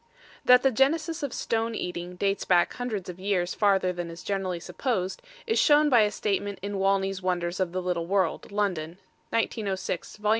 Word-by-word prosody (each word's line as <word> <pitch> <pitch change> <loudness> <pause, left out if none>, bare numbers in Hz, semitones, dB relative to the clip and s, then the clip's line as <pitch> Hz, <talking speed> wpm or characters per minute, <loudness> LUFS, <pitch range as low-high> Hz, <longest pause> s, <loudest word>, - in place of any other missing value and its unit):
That 250 0 +7
the 270 - +4
genesis 310 +6 +1
of 285 -3 -2
stone 225 0 -1
eating 180 -1 -5
dates 195 +2 0
back 175 -2 +3
hundreds 220 -7 -4
of 180 0 -7
years 185 -2 0
farther 195 -3 +2
than 175 -1 -5
is 165 0 -9
generally 190 -3 -2
supposed, 190 -1 -2 0.2
is 450 0 +1
shown 295 0 +5
by 245 -5 +6
a 210 - +3
statement 200 -1 -2
in 200 -1 -3
Wanley's 195 0 +1
Wonders 180 0 -1
of 185 -2 0
the 185 0 -3
Little 175 -2 -1
World, 190 -2 0
London, 180 -5 -1 0.3
1906, 200 -6 -2
Vol. 210 0 -1
195 Hz, 180 wpm, -27 LUFS, 180-225 Hz, 0.3 s, That